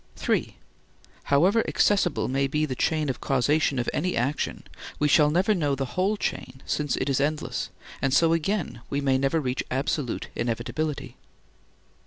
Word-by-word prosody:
(3) - - -1 0.7
However 185 +11 +4
accessible 195 -6 +2
may 135 +1 +1
be 150 +3 0
the 135 - -3
chain 155 +4 0
of 130 - -3
causation 140 +2 +2
of 120 - -1
any 180 +4 -1
action, 135 +5 -1 0.3
we 150 - +2
shall 150 0 +5
never 185 +7 +2
know 145 -7 0
the 135 -2 -4
whole 195 +4 +1
chain 130 -8 -4
since 150 -1 -1
it 130 - -1
is 135 -1 +1
endless, 150 +2 -2 0.3
and 135 - +1
so 165 +4 +4
again 165 - -1
we 140 - -1
never 135 +2 +2
reach 130 -3 -2
absolute 135 -1 -2
inevitability. 125 +6 -3
145 Hz, 155 wpm, -26 LUFS, 135-160 Hz, 0.7 s, shall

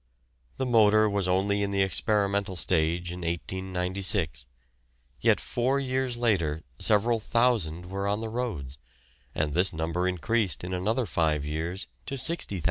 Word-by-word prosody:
The 130 - -1
motor 110 -3 +5
was 100 -3 0
only 100 +2 +1
in 100 - 0
the 100 -1 +2
experimental 100 +1 +1
stage 85 0 0
in 90 - -6
1896, 90 - -1 0.7
yet - - +3
four 130 +3 0
years 130 -2 -1
later 85 -10 0 0.2
several 110 +2 +3
thousand 110 -8 +1
were 100 +2 -3
on 100 +1 0
the 110 0 -4
roads, 85 - -4 0.6
and 75 -1 -1
this 90 +4 +4
number 85 +2 -1
increased 95 +3 0
in 90 +1 -4
another 110 +7 0
five 80 -5 0
years 80 +5 -3 0.2
to 135 - -3
60,000. 145 - 0
95 Hz, 140 wpm, -27 LUFS, 85-110 Hz, 0.7 s, motor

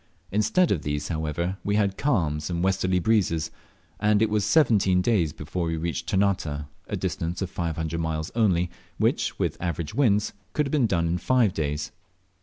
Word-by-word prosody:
Instead 110 - +2
of 85 - +1
these, 75 0 -3
however, 80 +3 -2
we 100 - 0
had 100 -2 +2
calms 85 - 0
and 85 0 -1
westerly 95 -1 +1
breezes, 90 -5 +1 0.5
and 105 -1 +3
it 110 0 +2
was 105 -1 +2
seventeen 100 - +4
days 90 -6 +2
before 80 +3 -4
we 80 0 -1
reached 85 0 -3
Ternate, 90 -7 0 0.2
a - - -3
distance 85 +2 -3
of 90 - -5
five 85 -2 -2
hundred 80 0 -3
miles 80 -1 -2
only, 90 -7 +2 0.3
which, - - +1
with - - -2
average 85 -3 -3
winds, 105 -5 +2 0.2
could 150 - +1
have 135 - -4
been 140 -6 +3
done 85 -5 +1
in 85 +2 0
five 120 -2 +3
days. 75 -1 -2
90 Hz, 180 wpm, -26 LUFS, 80-105 Hz, 0.5 s, seventeen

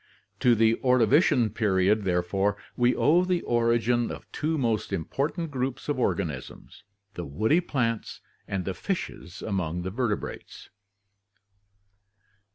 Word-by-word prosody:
To 120 -2 +4
the 115 +1 +3
Ordovician 125 - +4
period, 100 0 +2
therefore, 95 +3 0 0.2
we 120 0 +3
owe 170 +4 +4
the 180 -1 0
origin 120 0 +2
of - - -7
two 160 +1 -1
most 115 -7 -1
important 145 - -2
groups 130 -1 -3
of 145 -3 -1
organisms, 100 -1 -3 0.3
the 85 - -5
woody 110 - +1
plants 115 -9 -2 0.3
and 95 -3 -3
the 95 - -2
fishes 95 - -5
among 90 -4 -2
the 95 - -4
vertebrates. 115 -1 -4
115 Hz, 120 wpm, -27 LUFS, 95-130 Hz, 0.3 s, To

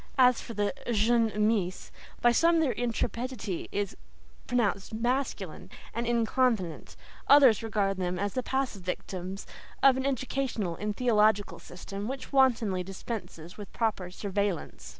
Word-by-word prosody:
As 250 -2 +5
for 230 - -8
the 205 0 0 0.2
"jeunes 225 0 +3
Meess," 210 -4 0 0.3
by 240 - +5
some 335 +7 +4
their 305 -5 +2
intrepidity 235 -4 -3
is 205 -1 -2 0.5
pronounced 220 -4 0
masculine 240 - -2 0.2
and 235 +1 -2
"inconvenant," 230 -6 0 0.3
others 270 -7 +7
regard 205 -3 0
them 180 -1 -2
as 200 +2 -2
the 255 - 0
passive 265 -6 -2
victims 185 +1 -5 0.4
of 270 -1 +7
an 265 - -2
educational 255 -8 -2
and 210 +3 -4
theological 215 -4 +2
system 195 +3 -7
which 270 +2 -6
wantonly 230 -8 +3
dispenses 180 -3 -7
with 205 - -8
proper 215 -6 -1
"surveillance." 200 -1 -3
220 Hz, 130 wpm, -29 LUFS, 195-245 Hz, 0.5 s, others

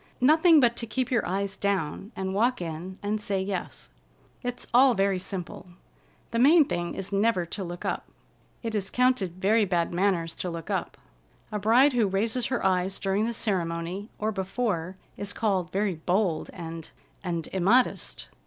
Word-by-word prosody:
Nothing 315 +5 +6
but 240 -3 +4
to 230 - -3
keep 255 +2 -2
your 230 -4 +2
eyes 195 +2 -2
down 200 0 -2
and 190 0 -3
walk 240 +5 +2
in 175 +2 -6
and 210 +1 -1
say 200 -2 -1
yes. 190 -1 -4 0.5
It's 245 0 -4
all 255 0 +6
very 195 -1 +1
simple. 185 -1 -6 0.6
The 230 - 0
main 300 +5 +7
thing 175 - -3
is 195 0 -5
never 200 -3 +2
to 195 +4 -5
look 175 -1 -7
up. - - -2 0.6
It 225 -1 -3
is 200 -3 -1
counted 250 -8 +2
very 210 +4 +3
bad 175 -3 0
manners 175 -3 +1
to 180 - -3
look 165 -1 -6
up. - - -2 0.5
A 210 - -2
bride 245 +7 +5
who 235 -4 +3
raises 220 +6 0
her 245 -6 -2
eyes 190 0 +1
during 200 +3 0
the 235 - -2
ceremony, 180 0 -2
or 215 +1 -1
before, 190 -3 -2 0.2
is 205 0 -3
called 190 -7 0
very 195 +1 0
bold 175 +1 0
and—and 165 0 -7
immodest!" 200 +8 +2
195 Hz, 165 wpm, -27 LUFS, 180-230 Hz, 0.6 s, main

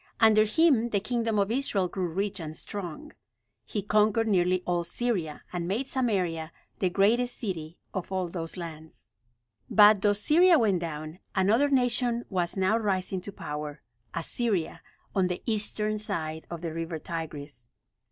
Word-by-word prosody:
Under 215 -1 +6
him 245 -1 +3
the 205 - +1
kingdom 230 0 -1
of 200 +1 +2
Israel 230 -7 +1
grew 185 0 -2
rich 195 +4 -2
and 155 -1 -6
strong. 205 - -6 0.6
He 205 - -3
conquered 215 +2 +3
nearly 185 -2 +2
all 175 -1 0
Syria, 175 -5 -2
and 175 -1 -2
made 225 +9 -1
Samaria 185 -12 -1 0.3
the 185 - +2
greatest 230 +7 +2
city 170 -7 -5 0.2
of 185 0 -4
all 185 -1 -1
those 165 0 -5
lands. 160 -8 -9 0.6
But 210 -1 +7
though 205 0 +4
Syria 325 - +5
went 210 -8 +2
down, 155 0 -6 0.2
another 220 +9 +3
nation 245 -2 +2
was 180 -1 -1
now 190 +4 +2
rising 190 -3 -1
to 200 - -7
power 150 -4 -6 0.3
Assyria, 185 +1 -1 0.3
on 190 -2 +2
the 180 -1 -4
eastern 215 -1 -1
side 160 -6 -4
of 170 0 -6
the 165 -2 -3
river 165 0 -3
Tigris. 150 -6 -6
190 Hz, 150 wpm, -28 LUFS, 170-220 Hz, 0.6 s, But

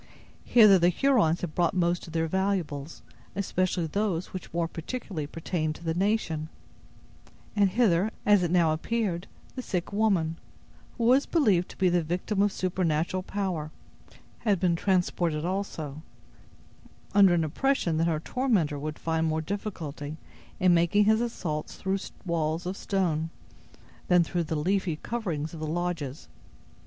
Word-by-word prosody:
Hither 215 -5 +7
the 175 +1 +5
Hurons 205 - +2
had 170 -4 -4
brought 175 0 +1
most 175 -1 +1
of 165 - -10
their 165 0 +1
valuables, 170 -5 -2 0.3
especially 185 -2 0
those 185 0 -2
which 185 - -7
more 170 0 0
particularly 165 - -5
pertained 155 0 -2
to - - -12
the 165 -1 0
nation; 175 -5 0 1.1
and 200 -2 +4
hither, 200 -2 +3 0.2
as 205 -2 +5
it 175 - 0
now 170 -2 +3
appeared, 190 0 -2 0.3
the 255 - -3
sick 185 -5 -3
woman, 190 -7 +1 0.6
who 235 - -1
was 255 +4 +4
believed 205 - +2
to - - -12
be 190 - +3
the 175 -1 +3
victim 180 +5 -1
of 205 0 +3
supernatural 180 -1 0
power, 185 -6 -3 0.7
had 205 -5 +1
been 175 -2 +2
transported 175 -4 0
also, 165 -6 -3 1.1
under 195 -3 +6
an 165 - +2
impression 170 - 0
that 165 +1 +2
her 160 -2 0
tormentor 185 - 0
would 150 +1 -4
find 160 0 0
more 160 0 0
difficulty 160 -5 -5 0.4
in 185 -1 +5
making 175 +5 +4
his 220 +2 +4
assaults 170 -10 -3
through 190 +1 -1 0.3
walls 165 0 -1
of 185 +2 -3
stone 170 -6 -1 0.8
than 180 -1 +5
through 170 0 -2
the 160 - -2
leafy 180 +2 0
coverings 165 -6 -4
of 165 - -7
the 155 - -3
lodges. 160 -4 -3
175 Hz, 150 wpm, -28 LUFS, 160-200 Hz, 1.1 s, Hither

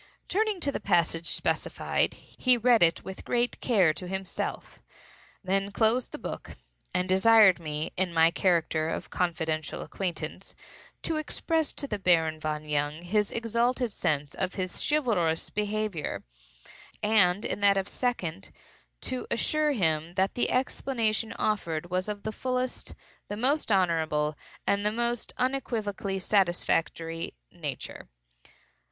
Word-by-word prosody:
Turning 425 0 +1
to 285 -4 -1
the - - -3
passage 170 -3 +1
specified, - - 0
he 255 -1 +1
read 240 0 +4
it 165 -1 +4
with 190 0 -8
great 245 0 0
care 190 -10 +4
to 180 +3 -7
himself, 190 0 -4 0.6
then 195 +1 0
closed 225 +4 +2
the - - -6
book, - - -7 0.3
and 180 0 0
desired 195 0 +6
me, 155 0 -3
in 185 -1 0
my 165 0 +5
character 165 -3 +1
of - - -4
confidential 160 -3 -1
acquaintance, 185 -3 -5 0.5
to 325 - 0
express 315 0 0
to - - -4
the 210 -7 -3
Baron 165 -4 +3
von 155 -1 -3
Jung 150 +2 -1
his 210 +3 +1
exalted 235 +1 0
sense 145 -5 -1
of 185 -1 -2
his 185 -2 -3
chivalrous 210 - +1
behavior, 210 -5 -2 0.8
and, 205 -3 +4
in - - -2
that 200 -1 +4
of 195 0 0
second, 195 -8 -2 0.5
to 255 -1 -2
assure 305 +5 +1
him 165 - 0
that 190 +1 +1
the 245 - +1
explanation 230 -4 0
offered 175 -5 -1
was 185 +3 0
of 205 -1 -5
the 220 - -2
fullest, 255 +2 -3 0.3
the 205 - -5
most 270 +2 +1
honorable, 160 -5 +2 0.3
and 200 0 +1
the 210 - +2
most 235 +1 0
unequivocally 220 -7 -1
satisfactory 175 - 0 0.2
nature. - - -6
195 Hz, 135 wpm, -28 LUFS, 170-235 Hz, 0.8 s, desired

